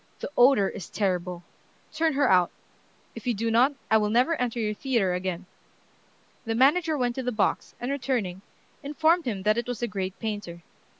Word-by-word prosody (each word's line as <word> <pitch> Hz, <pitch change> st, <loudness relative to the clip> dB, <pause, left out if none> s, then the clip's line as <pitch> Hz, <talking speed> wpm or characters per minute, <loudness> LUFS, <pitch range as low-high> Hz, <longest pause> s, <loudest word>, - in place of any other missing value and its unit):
The -, -, -6 dB
odor 245 Hz, -5 st, +5 dB
is 185 Hz, -, -7 dB
terrible. 180 Hz, -3 st, -2 dB, 0.5 s
Turn 320 Hz, 0 st, +1 dB
her 280 Hz, -1 st, +2 dB
out. 180 Hz, -4 st, +4 dB, 0.6 s
If -, -, -9 dB
you 240 Hz, -, +1 dB
do 230 Hz, +3 st, -1 dB
not, 250 Hz, +5 st, +4 dB, 0.2 s
I 220 Hz, -, +7 dB
will 210 Hz, -1 st, 0 dB
never 245 Hz, +9 st, +3 dB
enter 240 Hz, -1 st, -1 dB
your 215 Hz, -1 st, -1 dB
theatre 225 Hz, -6 st, 0 dB
again." 180 Hz, 0 st, -3 dB, 1.0 s
The 225 Hz, -2 st, -2 dB
manager 305 Hz, +6 st, +3 dB
went 245 Hz, -2 st, 0 dB
to -, -, -1 dB
the 250 Hz, -, -1 dB
box, 215 Hz, -3 st, -1 dB
and 245 Hz, +3 st, -3 dB
returning, 245 Hz, -10 st, -2 dB, 0.4 s
informed 315 Hz, +4 st, +1 dB
him 205 Hz, -6 st, -3 dB
that 215 Hz, +3 st, +2 dB
it 240 Hz, -, -5 dB
was 245 Hz, -2 st, -4 dB
the 240 Hz, -, 0 dB
great 190 Hz, -3 st, -4 dB
painter. 205 Hz, -6 st, -5 dB
230 Hz, 185 wpm, -26 LUFS, 195-265 Hz, 1.0 s, I